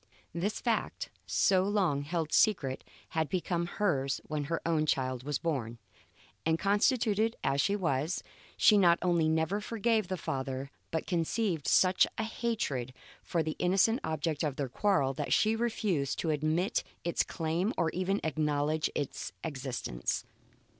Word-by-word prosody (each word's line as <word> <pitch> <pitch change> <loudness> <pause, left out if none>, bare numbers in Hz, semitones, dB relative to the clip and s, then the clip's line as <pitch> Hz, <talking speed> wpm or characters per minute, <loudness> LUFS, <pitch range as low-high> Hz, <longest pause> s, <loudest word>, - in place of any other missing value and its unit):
This 190 +6 -2
fact, 230 -3 -2 0.2
so 190 -2 +3
long 190 -8 +1
held 155 +1 -3
secret, 140 -11 +2 0.3
had 160 -1 -1
become 175 -2 -1
hers 140 -10 +1
when 150 -2 -3
her 165 +3 -1
own 160 -2 +1
child 130 -3 0
was 145 +2 -2
born; 125 -8 -2 0.7
and 160 0 +2
constituted 215 +2 +2
as 140 +1 +2
she 200 - +1
was, 160 -3 -1 0.3
she 210 -2 +6
not 170 -3 +5
only 170 -3 +3
never 160 +6 +1
forgave 225 -1 0
the 185 0 -2
father, 135 -2 -4 0.2
but 160 - -2
conceived 170 - -1
such 185 +8 +5
a 220 - 0
hatred 215 - -2 0.3
for 165 -2 -1
the 155 0 -3
innocent 195 +7 +3
object 155 -1 -1
of 150 -4 -1
their 140 -2 -3
quarrel 140 -4 +1
that - - -1
she 220 +1 +3
refused 210 - 0
to 160 - 0
admit 155 +7 0 0.2
its 170 - +1
claims 165 +6 -1
or 165 -3 +1
even 185 +2 0
to - - -6
acknowledge 150 0 0
its 145 - -3
existence. 130 - -3
165 Hz, 150 wpm, -31 LUFS, 145-195 Hz, 0.7 s, she